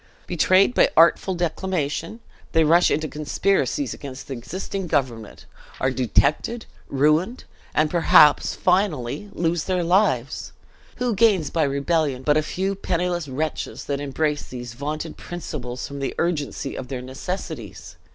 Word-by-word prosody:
Betrayed 185 +5 +3
by - - +4
artful 170 +3 +5
declamation, 175 +2 -2 0.3
they 160 - +5
rush 170 +3 +5
into 155 +1 0
conspiracies 195 - 0
against 135 -1 -8
the 140 - -4
existing 185 +9 -5
government, 120 -8 -2 0.3
are 130 - +1
detected, 130 - +1 0.2
ruined, 155 - +1 0.3
and 155 0 +2
perhaps 155 -3 +5
finally 180 - 0
lose 170 -3 -1
their 185 -2 0
lives! 170 - +1 0.4
Who 245 -2 -1
gains 200 -7 +3
by 160 -3 +2
rebellion, 140 -1 0
but 150 +2 +3
a 155 - +3
few 190 +5 -2
penniless 175 -3 -2
wretches, 150 +4 -4
that 140 0 -2
embrace 145 +1 -1
these 120 -2 -7
vaunted 150 +5 -5
principles 135 -8 -6
from 140 0 -7
the 135 - -3
urgency 150 -5 -2
of 125 - -6
their 125 -1 -5
necessities? 135 +9 -6
155 Hz, 135 wpm, -23 LUFS, 140-180 Hz, 0.4 s, artful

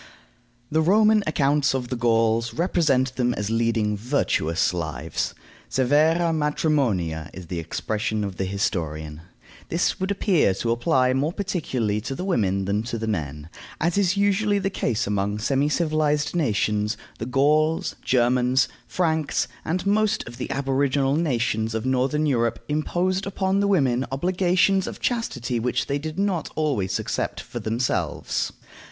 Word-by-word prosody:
The 160 +1 +3
Roman 210 +5 +4
accounts 145 -2 +2
of 125 -2 -3
the 125 - -2
Gauls 115 -1 +1
represent 140 -7 +1
them 125 -1 +1
as 105 +1 -3
leading 115 -2 +1
virtuous 100 - 0
lives. 80 -3 -3 0.3
Severa 155 +6 +3
matrimonia 140 - 0
is 95 - -8
the 85 0 -4
expression 105 +5 -2
of 100 -3 -5
the 95 - -1
historian. 80 -6 -3 0.5
This 170 +2 0
would 190 +1 -1
appear 185 - +2
to 115 +4 -1
apply 130 +1 +2
more 140 +4 0
particularly 135 - -2
to 135 +5 -4
the 180 - -4
women 100 - +1
than 100 +2 0
the 115 -1 -4
men. 75 -8 -3 0.3
As 170 +2 +1
is 200 -1 +2
usually 205 +1 +2
the 195 0 -1
case 120 - -1
among 100 0 -1
semi 135 +6 +1
civilized 150 -1 +1
nations, 105 -7 0 0.2
the 115 - -4
Gauls, 150 +5 +2
Germans, 125 +1 +2 0.2
Franks, 160 -4 0 0.2
and 180 +3 -2
most 215 - +1
of 120 0 -9
the - - -4
aboriginal 135 0 +1
nations 115 -8 0
of 110 +2 -2
Northern 130 +4 +1
Europe 120 -5 +1
imposed 180 +6 0
upon 195 0 0
the 200 - +2
women 135 -10 +2
obligations 185 +5 +2
of - - -6
chastity 130 - -1
which 125 +2 0
they 140 0 -1
did 155 +1 -6
not 195 -4 0
always 130 -12 0
accept - - -3
for - - -7
themselves. 115 +3 -1
130 Hz, 145 wpm, -24 LUFS, 110-165 Hz, 0.5 s, Roman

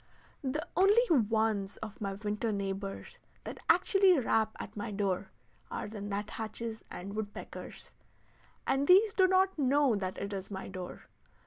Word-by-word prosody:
The 300 +5 -2
only 415 +5 +5
ones 220 -6 +2
of 215 -1 -8
my 195 -1 -2
winter 210 +2 -2
neighbors 195 -1 -4 0.2
that - - -7
actually 390 -4 +5
rap 220 -4 +1
at - - -7
my 205 0 -4
door 195 -2 -1 0.4
are - - -4
the 210 -1 -7
nut 205 +1 -3
hatches 225 0 -5
and 200 +3 -7
woodpeckers, 215 -1 -7 0.7
and 270 +1 +1
these 400 +3 +6
do 375 -4 +5
not 375 -2 +3
know 275 -2 +3
that 190 -2 -3
it 200 +1 -4
is 195 -1 -5
my 190 -1 -6
door. 185 -2 -7
220 Hz, 150 wpm, -31 LUFS, 200-285 Hz, 0.7 s, these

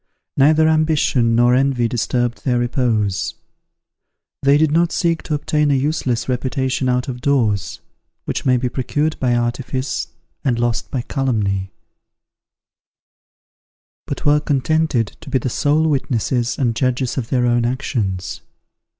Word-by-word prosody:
Neither 155 +3 +4
ambition 155 -7 +2
nor 120 +1 +4
envy 130 -2 +2
disturbed 120 +1 -1
their 125 -3 +1
repose. 120 -6 0 1.1
They 140 +1 +4
did 155 0 +2
not 170 +2 +2
seek 165 -2 0
to 155 - -2
obtain 150 0 0
a 140 - +3
useless 135 -3 -1
reputation 130 0 -1
out 125 0 0
of 125 -2 -5
doors, 115 -8 0 0.4
which - - -3
may 125 -1 +3
be 125 +1 -1
procured 145 +5 -2
by 125 -2 +1
artifice 125 +3 -2 0.4
and 125 -5 +1
lost 120 -1 -1
by 125 -3 -3
calumny; 105 -9 -1 2.4
but - - -5
were 145 0 +5
contented 150 -5 0
to 160 - -10
be 135 - +2
the 130 0 -2
sole 150 +6 +1
witnesses 125 -4 0
and 120 -4 0
judges 130 0 0
of 115 - -5
their 125 -2 +1
own 120 0 +2
actions. 115 -7 -2
130 Hz, 135 wpm, -19 LUFS, 120-145 Hz, 2.4 s, were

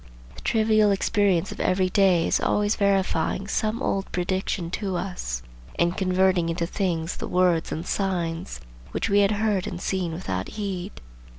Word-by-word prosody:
The - - -12
trivial 215 -2 +3
experience 200 -3 +2
of - - -8
every 185 0 +2
day 185 -4 +4
is - - +2
always 210 +1 +1
verifying 195 -2 +1
some 215 +3 -1
old 195 0 -1
prediction 180 -1 -2
to 195 -1 -2
us 175 - -4 0.3
and 170 +1 +2
converting 185 -2 +2
into 170 0 -1
things 170 -2 -2
the - - -4
words 180 -2 +2
and 160 +2 -3
signs 170 - -2 0.3
which - - -1
we 200 - +5
had 200 -1 +4
heard 210 -2 0
and 180 - -5
seen 185 -2 -1
without 95 - -3
heed. 195 -2 -4
185 Hz, 160 wpm, -25 LUFS, 170-200 Hz, 0.3 s, we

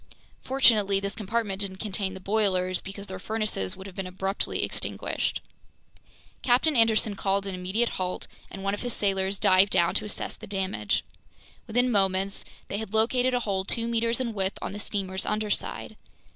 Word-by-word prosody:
Fortunately 215 -7 +4
this 200 +1 -2
compartment 210 -2 -2
didn't 190 -2 -1
contain 195 -2 -2
the - - -7
boilers, 185 -2 +1
because 200 +1 -7
their 190 -2 -7
furnaces 215 - -2
would 190 - -9
have 195 -2 -9
been 190 -1 -3
abruptly 190 +2 +1
extinguished. - - -2 1.0
Captain 270 +5 +3
Anderson 225 -2 +4
called 195 0 0
an 195 - -3
immediate 190 +6 0
halt, 185 0 -2 0.2
and 195 - -8
one 195 0 0
of 205 - -3
his 245 -1 -2
sailors 195 -1 0
dived 190 +2 +5
down 170 -2 +3
to 215 - +1
assess 210 - -4
the - - -11
damage. 190 - -1 0.6
Within 245 +3 +2
moments 195 -1 +1 0.2
they 200 - -3
had 220 -1 -5
located 245 +3 +3
a 245 - +1
hole 195 -4 -1
two 230 +4 0
meters 230 0 +1
in 240 -3 -2
width 195 -1 -1
on - - -4
the 205 - -5
steamer's 190 -2 -2
underside. 210 0 -2
200 Hz, 170 wpm, -27 LUFS, 190-220 Hz, 1.0 s, dived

